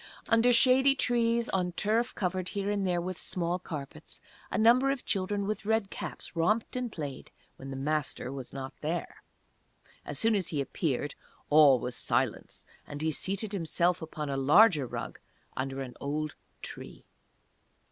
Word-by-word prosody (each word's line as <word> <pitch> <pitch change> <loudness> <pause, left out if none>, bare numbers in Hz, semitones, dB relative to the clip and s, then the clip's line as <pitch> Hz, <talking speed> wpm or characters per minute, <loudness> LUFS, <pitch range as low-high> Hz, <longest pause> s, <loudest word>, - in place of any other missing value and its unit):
Under 230 +2 +5
shady 260 +3 +5
trees, 235 -2 +2
on 180 -2 0
turf 225 +6 0
covered 185 -1 -2
here 200 +1 0
and 200 -2 0
there 175 -1 +1
with 180 +1 -4
small 175 0 -1
carpets, 155 -2 -8 0.3
a - - -2
number 240 +5 +5
of 275 -2 -2
children 200 +1 -1
with 210 0 -3
red 220 -1 0
caps - - -7
romped 210 +10 +1
and 250 -2 -2
played, 145 -7 -6 0.3
when 135 - -9
the 135 - -5
Master 145 -2 -2
was 135 -3 -7
not 135 -1 -6
there. 165 +3 -3 0.8
As - - -5
soon 225 0 +3
as 195 -5 0
he 150 - -2
appeared 140 0 -2 0.4
all 145 -3 +7
was 125 0 -4
silence, - - -1 0.2
and 145 +1 -6
he 160 - +1
seated 195 +6 -2
himself 175 -1 +1
upon 155 -1 -5
a 140 -1 -2
larger 150 - +5
rug, - - -6 0.4
under 135 +1 -3
an 125 -2 -8
old 150 +2 -2 0.3
tree. - - -9
180 Hz, 160 wpm, -30 LUFS, 145-220 Hz, 0.8 s, all